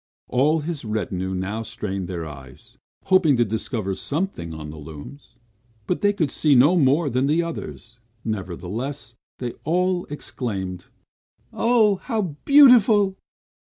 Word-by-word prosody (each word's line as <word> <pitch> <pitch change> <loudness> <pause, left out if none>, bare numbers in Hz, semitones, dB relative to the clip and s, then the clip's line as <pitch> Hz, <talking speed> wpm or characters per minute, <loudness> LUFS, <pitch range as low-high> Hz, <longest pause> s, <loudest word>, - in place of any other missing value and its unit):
All 150 +5 +2
his 155 -1 -4
retinue 95 -4 -3
now 100 +4 -3
strained 100 -4 -5
their 85 -3 -5
eyes, 70 -3 -12 0.2
hoping 185 -8 +4
to 120 - +3
discover 110 -1 -3
something 145 - -3
on 75 -1 -7
the 80 - -10
looms, 80 - -11 0.5
but 180 - -2
they 205 - +4
could 170 -8 -1
see 150 -3 +3
no 145 +8 +6
more 145 0 +3
than 130 +1 0
the 160 +4 +2
others; 120 -8 -8 0.3
nevertheless, 110 - -5 0.2
they 125 -2 -4
all 180 +2 0
exclaimed, 95 -11 -5 0.7
"Oh, 225 -4 +3
how 215 - -3
beautiful!" 230 -8 +6
130 Hz, 130 wpm, -23 LUFS, -, 0.7 s, no